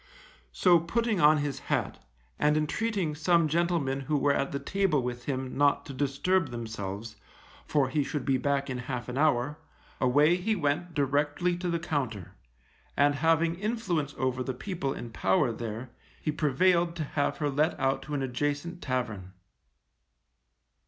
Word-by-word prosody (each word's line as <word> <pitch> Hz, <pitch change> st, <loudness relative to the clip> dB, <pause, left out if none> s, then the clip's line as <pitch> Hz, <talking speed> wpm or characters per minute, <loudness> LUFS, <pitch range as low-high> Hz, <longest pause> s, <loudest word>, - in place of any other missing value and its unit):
So 175 Hz, -2 st, +5 dB
putting 215 Hz, +3 st, 0 dB
on 150 Hz, +1 st, +6 dB
his 145 Hz, -2 st, -2 dB
hat, -, -, -1 dB, 0.4 s
and 150 Hz, +1 st, +3 dB
entreating 180 Hz, +2 st, -1 dB
some 165 Hz, +2 st, +3 dB
gentlemen 160 Hz, -4 st, 0 dB
who 150 Hz, +2 st, -1 dB
were 140 Hz, 0 st, +3 dB
at 135 Hz, 0 st, -1 dB
the 140 Hz, -, -2 dB
table 185 Hz, -4 st, 0 dB
with 120 Hz, 0 st, -4 dB
him 130 Hz, -2 st, -3 dB
not 140 Hz, 0 st, +3 dB
to 140 Hz, -, -7 dB
disturb 145 Hz, +5 st, +1 dB
themselves, 110 Hz, -2 st, -6 dB, 0.5 s
for 145 Hz, -3 st, +2 dB
he 145 Hz, +3 st, 0 dB
should 145 Hz, -1 st, -4 dB
be 135 Hz, -2 st, +2 dB
back 140 Hz, +1 st, 0 dB
in 130 Hz, -2 st, -3 dB
half 125 Hz, -1 st, -5 dB
an 125 Hz, -, -4 dB
hour, 150 Hz, 0 st, +2 dB, 0.4 s
away 145 Hz, +7 st, +4 dB
he 215 Hz, +5 st, 0 dB
went 165 Hz, 0 st, -1 dB
directly 145 Hz, +5 st, +1 dB
to 180 Hz, 0 st, -3 dB
the 170 Hz, -, +1 dB
Compter. 135 Hz, -, -3 dB, 0.7 s
And 145 Hz, 0 st, +4 dB
having 165 Hz, +3 st, +2 dB
influence 185 Hz, -, -2 dB
over 130 Hz, -1 st, -1 dB
the 130 Hz, 0 st, -3 dB
people 165 Hz, -3 st, -3 dB
in 120 Hz, -3 st, -6 dB
power 115 Hz, +5 st, +2 dB
there, 115 Hz, +2 st, -6 dB, 0.3 s
he 155 Hz, -, -1 dB
prevailed 170 Hz, +4 st, +2 dB
to 165 Hz, -, -2 dB
have 145 Hz, 0 st, -1 dB
her 145 Hz, -2 st, -1 dB
let 150 Hz, +4 st, +1 dB
out 135 Hz, 0 st, +1 dB
to 150 Hz, +1 st, -5 dB
an 135 Hz, -, -1 dB
adjacent 145 Hz, +6 st, -2 dB
tavern. 110 Hz, -8 st, -3 dB
145 Hz, 160 wpm, -29 LUFS, 130-170 Hz, 0.7 s, on